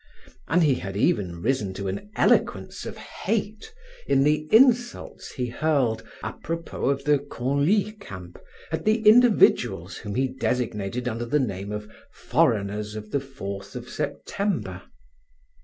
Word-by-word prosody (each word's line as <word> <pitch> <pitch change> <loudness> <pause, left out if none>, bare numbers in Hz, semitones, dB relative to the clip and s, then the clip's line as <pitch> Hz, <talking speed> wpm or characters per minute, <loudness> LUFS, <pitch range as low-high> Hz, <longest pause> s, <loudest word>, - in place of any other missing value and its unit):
And 175 +2 +3
he 145 -3 +4
had 95 -5 -4
even 90 -5 0
risen 110 -6 0
to 100 0 -4
an 100 - -4
eloquence - - +1
of - - -7
hate 215 - -3 0.4
in 135 - +4
the 150 +1 +2
insults 245 0 +3
he 125 - -2
hurled, 135 -4 +1 0.2
apropos 165 +1 -4
of 140 0 0
the 145 0 +3
Conlie 145 - +1
camp, 90 - -10 0.3
at 160 0 -2
the 215 0 +2
individuals 235 0 +5
whom 100 - -6
he 130 +1 +2
designated 125 -3 -2
under 120 0 -2
the 150 +6 +1
name 100 -5 -3
of 105 0 -5 0.2
"foreigners 105 0 0
of 105 0 -7
the 140 - +1
Fourth 100 -8 -7
of - - -6
September." 165 - -3
130 Hz, 140 wpm, -25 LUFS, 105-165 Hz, 0.4 s, individuals